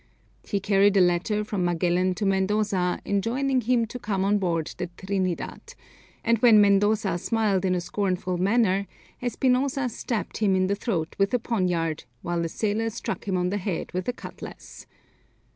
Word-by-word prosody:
He 200 Hz, -, -2 dB
carried 200 Hz, 0 st, +3 dB
a -, -, +6 dB
letter 180 Hz, +4 st, +2 dB
from 205 Hz, -3 st, -2 dB
Magellan 175 Hz, +1 st, +1 dB
to 205 Hz, -, -2 dB
Mendoza 195 Hz, -1 st, +1 dB
enjoining 250 Hz, +6 st, 0 dB
him 235 Hz, 0 st, +2 dB
to 245 Hz, +3 st, -8 dB
come 195 Hz, -4 st, -1 dB
on 205 Hz, +1 st, +2 dB
board 165 Hz, -4 st, -1 dB
the 180 Hz, -, -2 dB
Trinidad, 190 Hz, -2 st, -3 dB, 0.5 s
and 230 Hz, -1 st, +2 dB
when 230 Hz, -2 st, +7 dB
Mendoza 200 Hz, -2 st, +3 dB
smiled 205 Hz, -3 st, +1 dB
in 185 Hz, -1 st, +2 dB
a 180 Hz, -, -1 dB
scornful 185 Hz, -1 st, -2 dB
manner, 200 Hz, 0 st, +2 dB, 0.3 s
Espinosa 255 Hz, +1 st, +1 dB
stabbed 220 Hz, -4 st, -4 dB
him 200 Hz, -3 st, +2 dB
in 185 Hz, 0 st, +2 dB
the 195 Hz, -, +1 dB
throat 175 Hz, -7 st, -2 dB
with 195 Hz, +4 st, +2 dB
a -, -, +2 dB
poniard, 180 Hz, -9 st, -1 dB, 0.2 s
while 175 Hz, -1 st, -1 dB
a 165 Hz, -, -2 dB
sailor 220 Hz, +4 st, -1 dB
struck 220 Hz, -, -5 dB
him 190 Hz, -2 st, 0 dB
on 180 Hz, 0 st, 0 dB
the 205 Hz, -, 0 dB
head 185 Hz, -2 st, -3 dB
with 185 Hz, 0 st, -3 dB
a 245 Hz, -, 0 dB
cutlass. -, -, -10 dB
200 Hz, 170 wpm, -25 LUFS, 180-220 Hz, 0.5 s, when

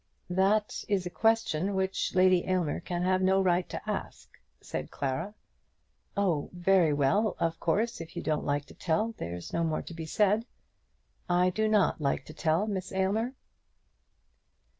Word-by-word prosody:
"That 200 Hz, +3 st, +1 dB
is 195 Hz, -3 st, 0 dB
a 180 Hz, -, -4 dB
question 200 Hz, -2 st, +1 dB
which 190 Hz, 0 st, -1 dB
Lady 185 Hz, -1 st, +5 dB
Aylmer 180 Hz, -5 st, 0 dB
can 175 Hz, 0 st, -3 dB
have 185 Hz, 0 st, +2 dB
no 190 Hz, +1 st, +4 dB
right 180 Hz, -1 st, +2 dB
to -, -, -6 dB
ask," -, -, -4 dB, 0.3 s
said -, -, -5 dB
Clara. 160 Hz, +10 st, -3 dB, 0.8 s
"Oh; 175 Hz, -8 st, +1 dB
very 180 Hz, -2 st, +3 dB
well. 165 Hz, +10 st, +2 dB
Of 165 Hz, -1 st, -1 dB
course, 210 Hz, +5 st, 0 dB
if 165 Hz, 0 st, -10 dB
you -, -, -4 dB
don't 155 Hz, -1 st, 0 dB
like 145 Hz, 0 st, -1 dB
to -, -, -14 dB
tell, 215 Hz, +7 st, 0 dB
there's 85 Hz, +1 st, -6 dB
no 170 Hz, -, +1 dB
more 160 Hz, -1 st, -1 dB
to -, -, -9 dB
be 165 Hz, -1 st, -6 dB
said." 210 Hz, +6 st, +2 dB, 0.8 s
"I 180 Hz, +1 st, +3 dB
do 215 Hz, +4 st, 0 dB
not 210 Hz, -6 st, +2 dB
like 140 Hz, -1 st, 0 dB
to 155 Hz, -, -10 dB
tell, 160 Hz, +5 st, +1 dB
Miss 190 Hz, -4 st, -3 dB
Aylmer." 205 Hz, +7 st, 0 dB
185 Hz, 160 wpm, -29 LUFS, 160-200 Hz, 0.8 s, Lady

